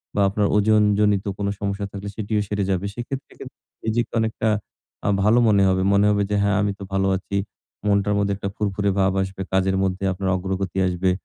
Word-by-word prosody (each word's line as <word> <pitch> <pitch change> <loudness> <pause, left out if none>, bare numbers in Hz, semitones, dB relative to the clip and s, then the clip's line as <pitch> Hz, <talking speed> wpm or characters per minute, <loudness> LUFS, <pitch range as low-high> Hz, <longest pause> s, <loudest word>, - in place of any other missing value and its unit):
বা 100 - +2
আপনার 100 +1 +1
ওজন 105 +1 +4 0.2
জনিত 105 -1 +2
কোন 100 - -2
সমস্যা 100 0 -2
থাকলে, 100 0 -7
সেটিও 105 0 -1
সেরে 105 0 -1
যাবে। 95 +1 -1
সেক্ষেত্রে 130 +4 -6
কিন্তু - - -10 0.3
নিজেকে 115 +2 0
অনেকটা 110 0 0 0.6
আ - - +3
ভালো 110 +4 +5
মনে 100 -2 +4
হবে। 95 0 +1
মনে 100 +1 +4
হবে 105 -1 +2
যে, - - +2
হ্যাঁ, 100 -1 +2
আমি 100 0 +1
তো - - -6
ভালো 95 0 +2
আছি, 100 +1 -6 0.5
মনটার 100 0 +2
মধ্যে 100 0 +1
একটা 100 0 -3
ফুরফুরে 100 -1 0
ভাব 95 0 +3
আসবে, 95 0 -4
কাজের 95 0 +2
মধ্যে 95 0 -2
আপনার 95 +1 -2
অগ্রগতি 95 0 -3
আসবে, 90 +1 +1
100 Hz, 195 wpm, -23 LUFS, 95-105 Hz, 0.6 s, ভালো